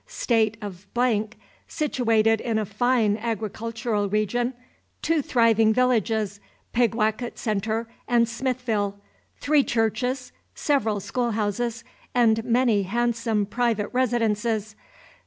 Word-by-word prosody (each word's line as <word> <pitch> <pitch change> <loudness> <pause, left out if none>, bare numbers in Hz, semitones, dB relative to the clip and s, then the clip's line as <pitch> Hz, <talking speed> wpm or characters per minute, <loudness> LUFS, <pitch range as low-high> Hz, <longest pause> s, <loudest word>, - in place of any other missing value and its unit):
State 225 -2 +1
of, 190 -1 -8 0.8
situated 225 -7 +1
in 230 -2 -1
a 215 - 0
fine 215 0 +1
agricultural 225 -1 -2
region, 235 +5 0 0.5
2 325 -2 +2
thriving 225 -4 +3
villages, 220 -5 +1 0.3
Pigwacket 235 0 0
Centre 220 +1 -1 0.2
and 235 -1 +3
Smithville, 230 -5 -2 0.4
3 295 -1 +4
churches, 250 +3 -1 0.2
several 225 -8 +1
school 240 +3 -2
houses, 225 +3 -2 0.3
and 225 -2 +3
many 235 -3 +2
handsome 230 +1 0
private 220 -1 0
residences. 225 -3 0
225 Hz, 100 wpm, -25 LUFS, 215-245 Hz, 0.8 s, 3